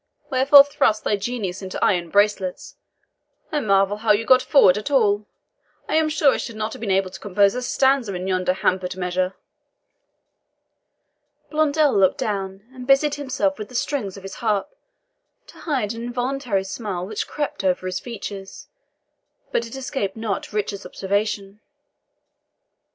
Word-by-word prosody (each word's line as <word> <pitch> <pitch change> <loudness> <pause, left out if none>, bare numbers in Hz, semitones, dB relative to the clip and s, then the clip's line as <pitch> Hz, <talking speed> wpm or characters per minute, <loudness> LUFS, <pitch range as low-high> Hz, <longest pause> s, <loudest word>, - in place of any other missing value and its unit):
"Wherefore 275 +2 +8
thrust 220 -6 +1
thy 210 - +1
genius 200 -3 -4
into 190 -1 -6
iron 175 -4 +1
bracelets? 200 -1 0 0.8
I 300 - +1
marvel 195 -3 +2
how 215 0 +2
you 215 +2 0
got 255 +1 +6
forward 195 -11 +5
at 210 +6 -4
all. 210 -6 +2 0.6
I - - -3
am 315 -1 +3
sure 300 -2 +3
I - - -1
should 230 - -6
not 215 +1 -3
have - - -9
been 220 -2 -4
able 190 -1 +1
to 190 - -9
compose 200 0 +2
a 250 - -3
stanza 265 -4 +1
in 180 +1 -4
yonder 185 -1 +1
hampered 185 -1 -1
measure." 185 +1 -1 2.2
Blondel 305 -1 +2
looked 195 -2 +3
down, 195 -1 -3
and 250 -1 -9
busied 275 +2 +4
himself 255 -9 -1
with 210 - -6
the 250 - -12
strings 230 -8 -2
of 195 - -11
his 195 0 -7
harp, 210 -4 0 0.7
to - - -16
hide 255 -10 -1
an 230 - -7
involuntary 245 -3 -2
smile 195 -2 -4
which 210 +2 -4
crept 295 -5 -4
over 185 -1 0
his 185 0 -2
features; 200 -4 -8 0.8
but 235 - 0
it 230 - -9
escaped 255 -7 -3
not 220 -3 -3
Richard's 205 -1 -3
observation. 200 0 -2
210 Hz, 155 wpm, -22 LUFS, 195-255 Hz, 2.2 s, Wherefore